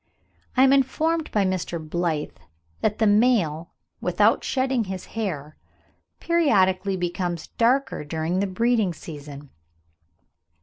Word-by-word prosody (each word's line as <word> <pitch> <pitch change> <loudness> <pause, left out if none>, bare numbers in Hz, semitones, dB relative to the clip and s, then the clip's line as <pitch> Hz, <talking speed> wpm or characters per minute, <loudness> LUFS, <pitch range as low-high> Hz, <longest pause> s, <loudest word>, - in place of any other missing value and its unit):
I 260 - +6
am 270 0 +6
informed 315 +4 +1
by 205 -2 +2
Mr. 185 -2 -2
Blyth 160 -1 -3 0.4
that 215 -1 0
the 220 - +2
male, 205 -7 +2 0.3
without - - +2
shedding 260 -3 0
his 190 -1 -6
hair, 155 -10 -4 0.6
periodically 200 - +2
becomes 175 -1 -3
darker 250 - +1
during 160 +4 -2
the 200 - 0
breeding 220 -2 +1
season. 145 -2 -10
190 Hz, 115 wpm, -24 LUFS, 165-240 Hz, 0.6 s, I